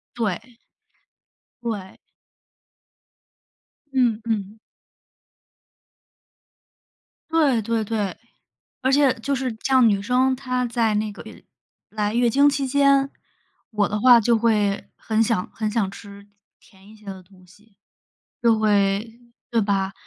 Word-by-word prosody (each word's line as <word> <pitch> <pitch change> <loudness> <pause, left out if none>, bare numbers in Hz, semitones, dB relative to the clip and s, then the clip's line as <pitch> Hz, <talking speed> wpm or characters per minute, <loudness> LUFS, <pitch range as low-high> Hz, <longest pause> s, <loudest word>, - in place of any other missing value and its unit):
对。 230 +1 -4 1.1
对。 205 -5 -5 2.0
嗯 245 -4 +1
嗯。 215 -2 -3 2.7
对 295 -8 +2
对 225 +1 -1
对， 210 -3 -2 0.7
而 260 0 +1
且 275 -2 +4
就 275 +5 -2
是 260 -1 -2
这 225 +4 -3
样， 255 -3 +6
女 200 -2 +1
生 255 +4 +1
她 255 -1 -2
在 230 -3 0
那 210 0 -1
个 205 - -11
月 - - -13 0.5
来 210 -1 -2
月 240 0 +2
经 280 +5 +4
期 280 -1 -2
间， 275 0 +3 0.6
我 210 -2 +1
的 210 - -2
话 245 +1 +7
就 230 +1 +2
会 210 -3 +1
很 220 0 -1
想 225 -5 -1
很 215 -1 -2
想 210 -4 0
吃 200 0 -13 0.3
甜 195 -1 -22
一 215 - -15
些 215 -1 -20
的 190 -1 -8
东 185 0 -21
西。 200 +3 -24 0.6
就 230 -2 +3
会 200 -1 +2 0.5
对 235 - +2
吧？ 195 -2 0
225 Hz, 135 characters per minute, -22 LUFS, 205-250 Hz, 2.7 s, 话